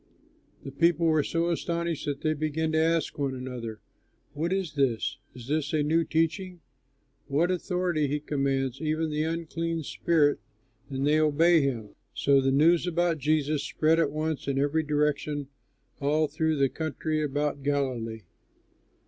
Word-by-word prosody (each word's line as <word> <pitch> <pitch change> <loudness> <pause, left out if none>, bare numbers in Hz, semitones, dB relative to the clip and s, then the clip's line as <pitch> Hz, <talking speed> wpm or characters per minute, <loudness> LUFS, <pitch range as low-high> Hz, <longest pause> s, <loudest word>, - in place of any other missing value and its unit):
The 135 - -7
people 165 +3 +2
were 155 -2 +4
so 170 +3 0
astonished 170 -1 -2
that 140 -1 -3
they 155 - +1
began 155 +1 -1
to 160 - +2
ask 165 -1 +1
one 135 -2 -1
another, 125 -4 -6 0.5
"What 165 +4 -2
is 190 -5 -1
this? 135 -6 0 0.2
Is 125 -1 -10
it 150 -2 0
a 155 -1 +2
new 165 +3 +2
teaching? 165 +3 -1 0.7
With 160 +6 +2
authority 180 -4 0
he 145 +2 -1
commands 135 -2 -1
even 155 0 -1
the 150 0 -1
unclean 165 0 -3
spirits 150 -1 +1 0.5
and 135 0 -2
they 150 +1 +4
obey 160 +2 +4
him." 120 -7 -2 0.2
So 140 -1 +3
the 135 - +1
news 165 +5 +4
about 175 -1 +1
Jesus 150 0 +1
spread 160 +1 +2
at 160 -4 +2
once 155 0 -3
in 140 -1 0
every 145 +3 +2
direction 150 -1 -1 0.5
all 150 +2 +2
through 155 +2 0
the 140 -2 +3
country 155 0 -2
about 145 0 -1
Galilee. 130 -6 -2
155 Hz, 155 wpm, -27 LUFS, 140-165 Hz, 0.7 s, were